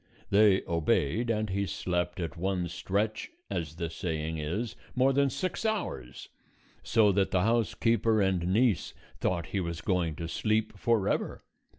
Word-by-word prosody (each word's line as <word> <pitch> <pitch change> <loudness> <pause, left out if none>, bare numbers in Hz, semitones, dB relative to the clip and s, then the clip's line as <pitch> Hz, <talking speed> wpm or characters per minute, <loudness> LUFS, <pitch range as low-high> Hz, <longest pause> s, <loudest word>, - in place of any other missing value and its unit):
They 100 -1 +5
obeyed, 85 - +1
and 110 -2 0
he 100 +1 0
slept 90 +1 -2
at 85 -1 -3
one 90 0 -1
stretch, 105 +5 -2 0.2
as 80 -2 -3
the 85 -1 -3
saying 80 -2 -3
is, 95 +10 -3 0.2
more 130 +1 +4
than 140 +1 +3
six 185 - -3
hours, 205 - -3 0.5
so 110 -3 +4
that 95 0 +2
the 90 - +2
housekeeper 115 0 +2
and 95 -3 +1
niece 105 -3 +2 0.2
thought 85 -2 0
he 100 - +1
was 85 -2 -3
going 90 -5 0
to 85 +2 -5
sleep 110 +5 0
forever. 110 -1 0
95 Hz, 150 wpm, -29 LUFS, 85-110 Hz, 0.5 s, They